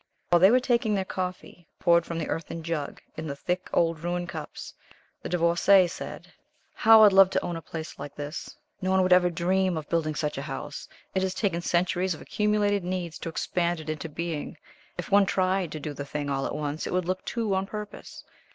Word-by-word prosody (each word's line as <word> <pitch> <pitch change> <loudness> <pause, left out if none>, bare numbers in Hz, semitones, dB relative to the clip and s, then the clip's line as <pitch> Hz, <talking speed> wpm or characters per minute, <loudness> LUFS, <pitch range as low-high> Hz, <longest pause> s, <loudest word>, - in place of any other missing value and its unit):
While 175 - +5
they 190 +3 +7
were 250 +3 +5
taking 235 -4 +1
their 190 -1 -1
coffee, 180 -2 -5
poured 170 -1 +4
from 170 - -4
the 165 - -2
earthen 165 +1 -4
jug, 155 -3 -3 0.2
in 160 0 -4
the 140 - -4
thick 180 +5 -3
old 165 -2 +2
Rouen 175 0 -1
cups, 160 -3 -7 0.5
the - - -6
Divorcée 175 +2 +4
said: - - -8 0.4
"How 220 0 +7
I'd 205 -2 +7
love 195 -1 +8
to - - -1
own 175 - -3
a 165 - -5
place 160 -1 -7
like 145 0 -7
this. 145 +2 -6 0.2
No 185 - -1
one 190 0 +4
would 185 0 +5
ever 180 0 +5
dream 180 +1 +1
of 155 -2 -5
building 155 -2 0
such 150 -2 -2
a 140 - -6
house. 145 +2 -6 0.3
It 190 - +1
has 190 0 -1
taken 180 -5 0
centuries 180 +1 +1
of - - -12
accumulated 210 -2 +1
needs 175 -2 -4
to - - -4
expand 170 +1 -1
it 155 0 -4
into 155 +1 -5
being. 165 0 -4 0.4
If - - -6
one 200 0 +5
tried 185 -2 +1
to 155 - -5
do 150 0 -5
the 140 - -5
thing 145 0 -4
all 135 0 -1
at - - -4
once 150 +1 -3
it - - -4
would 180 -1 +1
look 185 +1 -2
too 225 -4 -1
on 190 0 0
purpose. 210 0 -8
175 Hz, 215 wpm, -27 LUFS, 160-190 Hz, 0.5 s, love